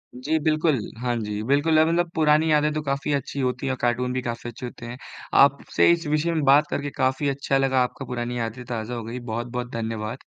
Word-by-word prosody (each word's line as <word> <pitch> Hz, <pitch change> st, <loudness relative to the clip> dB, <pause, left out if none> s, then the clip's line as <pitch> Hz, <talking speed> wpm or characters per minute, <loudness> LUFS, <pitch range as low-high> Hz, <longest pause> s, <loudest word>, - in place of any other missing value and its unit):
जी 150 Hz, +6 st, -1 dB
बिल्कुल, 155 Hz, -2 st, +2 dB, 0.2 s
हाँ 120 Hz, -1 st, -1 dB
जी, 105 Hz, -2 st, -3 dB
बिल्कुल। 145 Hz, +5 st, +2 dB
अब 160 Hz, -, +5 dB
मतलब 170 Hz, +1 st, +1 dB
पुरानी 155 Hz, 0 st, +3 dB
यादें 150 Hz, 0 st, +3 dB
तो 155 Hz, -, -2 dB
काफ़ी 140 Hz, +1 st, -2 dB
अच्छी 140 Hz, 0 st, -3 dB
होती 125 Hz, 0 st, -1 dB
हैं 135 Hz, -, 0 dB
और 130 Hz, -, -5 dB
कार्टून 125 Hz, +1 st, 0 dB
भी 130 Hz, -, -1 dB
काफ़ी 120 Hz, 0 st, -5 dB
अच्छे 120 Hz, +2 st, -8 dB
होते 120 Hz, -1 st, -9 dB
हैं। 120 Hz, +1 st, -7 dB, 0.4 s
आपसे 140 Hz, +3 st, +4 dB
इस 170 Hz, -1 st, 0 dB
विषय 155 Hz, +3 st, +1 dB
में 155 Hz, -3 st, 0 dB
बात 140 Hz, +3 st, +5 dB
करके 145 Hz, 0 st, -2 dB
काफ़ी 130 Hz, +2 st, +1 dB
अच्छा 140 Hz, 0 st, 0 dB
लगा, 135 Hz, -1 st, +2 dB
आपका 135 Hz, +2 st, -5 dB
पुरानी 120 Hz, 0 st, -4 dB
यादें 115 Hz, +2 st, -4 dB
ताज़ा 115 Hz, 0 st, -4 dB
हो 115 Hz, -, -5 dB
गई, 115 Hz, +3 st, -6 dB
बहुत-बहुत 120 Hz, +1 st, -4 dB
धन्यवाद। 115 Hz, 0 st, -3 dB
130 Hz, 220 wpm, -24 LUFS, 120-150 Hz, 0.4 s, अब